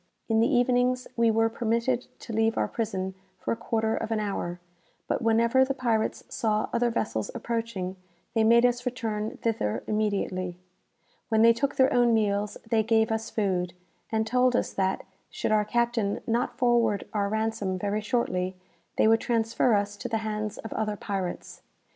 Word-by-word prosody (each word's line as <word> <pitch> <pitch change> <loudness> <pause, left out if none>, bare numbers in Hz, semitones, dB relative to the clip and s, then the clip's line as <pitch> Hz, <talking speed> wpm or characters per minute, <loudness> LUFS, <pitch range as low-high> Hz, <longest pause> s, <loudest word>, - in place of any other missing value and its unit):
In 225 -1 +2
the 230 - +3
evenings 250 +1 +2
we 230 -1 +3
were 225 0 +3
permitted 235 +2 0
to 230 - -7
leave 225 +1 +2
our - - +2
prison 190 -4 -3 0.2
for - - -3
a - - +1
quarter 220 -1 -1
of - - -3
an 225 -1 0
hour; 195 -4 -3 0.5
but - - -1
whenever 230 +3 +4
the 270 +1 -1
pirates 230 -4 0
saw 215 -1 0
other 240 0 +2
vessels 160 - -2
approaching, 225 -6 -3 0.4
they 225 - +3
made 235 +2 +6
us 245 0 +1
return 225 -4 -3
thither 215 - -1
immediately. 195 -4 -1 0.7
When 220 -1 +4
they 230 0 +7
took 275 +4 -1
their 260 0 +4
own 240 -1 +4
meals, 205 -1 0
they 225 0 +3
gave 220 0 +2
us 220 0 -2
food, 180 -4 -1 0.4
and 220 0 +1
told 250 +2 +2
us - - 0
that, 190 0 0 0.3
should - - -2
our 210 -1 +3
captain 235 -2 0
not 245 +1 -1
forward 235 -4 +2
our 200 -2 0
ransom 220 -3 -1
very 205 +3 -1
shortly, 190 -6 -1 0.4
they - - +4
would 225 0 +4
transfer 230 0 +2
us 205 0 -1
to 245 - -5
the 225 - 0
hands 215 -1 -3
of 225 - -7
other 215 -1 -1
pirates. 190 -3 -5
225 Hz, 170 wpm, -27 LUFS, 205-235 Hz, 0.7 s, they